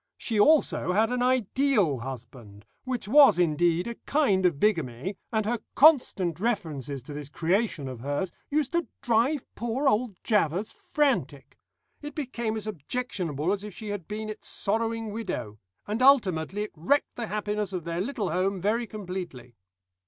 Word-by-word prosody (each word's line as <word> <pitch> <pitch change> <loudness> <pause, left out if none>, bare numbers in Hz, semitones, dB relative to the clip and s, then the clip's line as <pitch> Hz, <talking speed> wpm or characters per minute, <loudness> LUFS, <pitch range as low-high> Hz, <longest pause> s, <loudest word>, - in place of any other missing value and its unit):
She 220 -3 -2
also 285 -7 +4
had 220 +4 +2
an 250 0 0
ideal 250 - +2
husband, 115 -4 -9 0.2
which 250 -6 -3
was, 275 - +7
indeed, 175 +1 +2
a 235 - -4
kind 200 -11 +3
of 160 -5 -2
bigamy, 165 - 0 0.2
and 220 -2 0
her 235 +2 0 0.2
constant 225 - +4
references 155 - -2
to 145 - -9
this 145 -1 -7
creation 170 - 0
of 130 -3 -7
hers 145 +8 -2 0.2
used 290 -2 0
to 340 -1 0 0.2
drive 245 +4 +2
poor 240 +5 -1
old 230 -4 +1
Javvers 205 -1 +1
frantic. 160 - -1 0.4
It 295 -1 -8
became 235 -6 -3
as 215 - -4
objectionable 180 - -2
as 205 0 -4
if 210 -3 -8
she 215 - -7
had 205 -5 -5
been 215 +1 -4
its 215 0 -7
sorrowing 225 +1 -1
widow, 180 - -5 0.3
and 215 +4 -3
ultimately 205 - +3
it 210 - -7
wrecked 185 - +1
the 235 -2 -4
happiness 210 -1 -2
of 180 -3 -4
their 170 +1 -2
little 215 -3 -2
home 190 +1 0
very 225 +5 0
completely. 180 - -7
205 Hz, 160 wpm, -27 LUFS, 165-235 Hz, 0.4 s, was